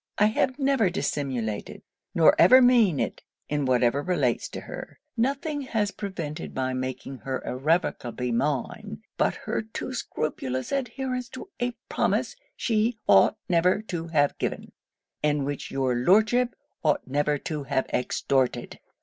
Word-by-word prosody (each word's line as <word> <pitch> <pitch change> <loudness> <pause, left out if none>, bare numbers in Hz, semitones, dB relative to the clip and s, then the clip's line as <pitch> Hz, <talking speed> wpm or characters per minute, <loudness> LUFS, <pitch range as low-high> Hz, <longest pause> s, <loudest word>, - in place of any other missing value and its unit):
I 210 - +5
have 260 +3 +1
never 270 -8 +2
dissimulated; 130 - -3 0.3
nor 165 - +7
ever 255 +10 +9
mean 235 - +5
it - - -2 0.3
in 145 -1 0
whatever 125 +1 +2
relates 145 -9 0
to - - -6
her. - - -9 0.2
Nothing 280 +5 -1
has 220 -6 -1
prevented 170 -7 -5
my 130 0 -1
making 130 +1 -4
her 130 -1 -3
irrevocably 130 -4 -1
mine, 135 +2 -2
but - - +2
her - - -1
too 220 +4 -6
scrupulous 130 - -3
adherence 255 -1 -2
to 260 +8 -9
a 245 0 -1
promise - - 0 0.2
she 225 0 +1
ought - - +6
never 180 +1 +3
to 165 -1 -3
have 145 -3 +1
given, - - -3 0.5
and 150 -2 +1
which 145 0 -4
your 135 -2 0
Lordship 215 - +3 0.3
ought 150 -2 +1
never 145 +2 +1
to 150 -1 -5
have 135 -1 0
extorted.' 125 -1 0
155 Hz, 140 wpm, -26 LUFS, -, 0.5 s, ever